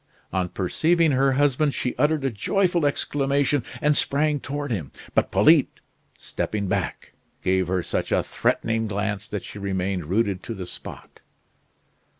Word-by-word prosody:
On 90 -1 0
perceiving 160 - +2
her 135 0 +3
husband, 145 +1 +2
she 125 - -2
uttered 150 +1 +1
a 135 - +1
joyful 175 - +1
exclamation, 140 -1 +1 0.2
and 150 0 +4
sprang 145 +1 +2
toward 145 0 -4
him. 85 - -3 0.2
But - - +2
Polyte, - - +4 0.4
stepping 100 -2 -3
back, 95 -5 -3 0.3
gave 95 -1 +2
her 90 -1 0
such - - -2
a - - +2
threatening 115 0 0
glance 105 0 -2
that 105 -2 -4
she 105 - -9
remained 95 -3 -2
rooted 100 0 0
to 115 - -6
the 95 -2 -6
spot. - - -10
115 Hz, 150 wpm, -24 LUFS, 95-145 Hz, 0.4 s, and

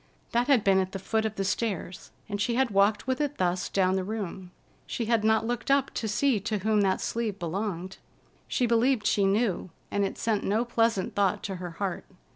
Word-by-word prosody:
That 240 +2 +1
had 270 -7 +4
been 195 -1 +4
at 190 0 -2
the - - -2
foot 220 +3 0
of 215 - -7
the 195 - -1
stairs, 195 -3 -3 0.2
and 205 -1 -3
she 235 +3 +1
had 260 -2 +2
walked 200 +1 +3
with 260 +1 -1
it 290 -1 -2
thus 180 0 0
down 190 -1 +2
the 190 - 0
room. 195 -3 -5 0.4
She 235 - -2
had 225 -1 +2
not 220 0 +3
looked 240 +1 -3
up 275 -1 +2
to 225 - -2
see 235 +2 +2
to 215 +2 -2
whom 210 +1 +2
that 190 -1 +2
sleeve 225 -4 -2
belonged. 185 +1 -4 0.5
She 250 - +1
believed 235 0 +2
she 200 -1 +3
knew, 195 -2 +1 0.2
and 200 - +1
it 195 - -2
sent 220 -3 0
no 220 +4 +1
pleasant 230 -4 +1
thought 200 -2 +1
to 195 -2 -4
her 175 -1 -6
heart. 195 -3 -3
210 Hz, 215 wpm, -28 LUFS, 190-230 Hz, 0.5 s, had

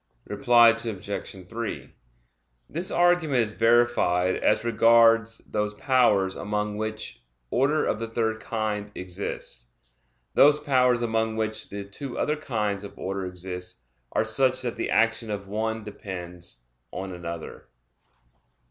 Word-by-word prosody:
Reply 120 +1 +5
Obj. 100 -4 -4
3: 115 +3 -5 0.7
This 170 +4 -2
argument 175 -7 +3
is 105 - -3
verified 115 -6 +3
as - - +2
regards 115 0 +4
those 105 0 -1
powers 115 -7 +3
among 105 0 -2
which 110 0 -5 0.3
order 145 +5 +2
of 105 - -1
the 115 - -3
third 110 -1 -1
kind 105 -2 -3
exists. 90 -9 -6 0.7
Those 145 +1 +6
powers 125 -4 +2
among 110 -1 0
which 110 0 -2
the 100 0 -5
two 120 +6 -7
other 150 - +1
kinds 105 -9 -2
of 100 - -10
order 95 0 -3
exist 90 -2 -7 0.3
are - - +1
such 130 -1 +1
that 120 -2 -2
the - - -3
action 115 0 +2
of 100 -1 -4
one 110 +2 -2
depends 90 - -7 0.3
on 95 +1 -5
another. 85 -1 -7
110 Hz, 130 wpm, -26 LUFS, 100-120 Hz, 0.7 s, Those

